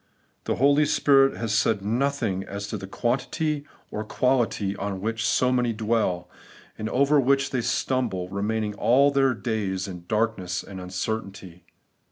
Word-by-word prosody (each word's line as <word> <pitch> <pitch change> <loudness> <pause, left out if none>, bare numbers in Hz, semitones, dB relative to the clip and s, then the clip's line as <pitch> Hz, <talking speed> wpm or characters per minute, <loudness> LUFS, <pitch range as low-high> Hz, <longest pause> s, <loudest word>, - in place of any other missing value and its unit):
The - - 0
Holy 145 +3 +4
Spirit 135 -2 +4
has 115 -2 -2
said 105 -1 +2
nothing 115 -4 0
as 100 +1 -6
to 100 -3 -5
quan 120 +6 0
tity 150 +2 -2 0.3
or 105 - -3
quality, 115 -4 0
on 100 -1 -4
which 110 +2 -2
so 125 0 +2
many 125 -2 +1
dwell, 105 -5 0 0.5
and 110 0 -4
over 140 +4 +3
which 140 +1 +2
they 130 - 0
stumble, 115 -8 -1
remaining 105 +2 -2
all 135 +7 +4
their 135 -2 +2
days 105 -5 -2
in 90 -3 -8
dark 110 0 0
ness 90 -1 -3
and 95 -1 -9
uncertainty. 95 -2 -5
110 Hz, 155 wpm, -25 LUFS, 100-130 Hz, 0.5 s, Holy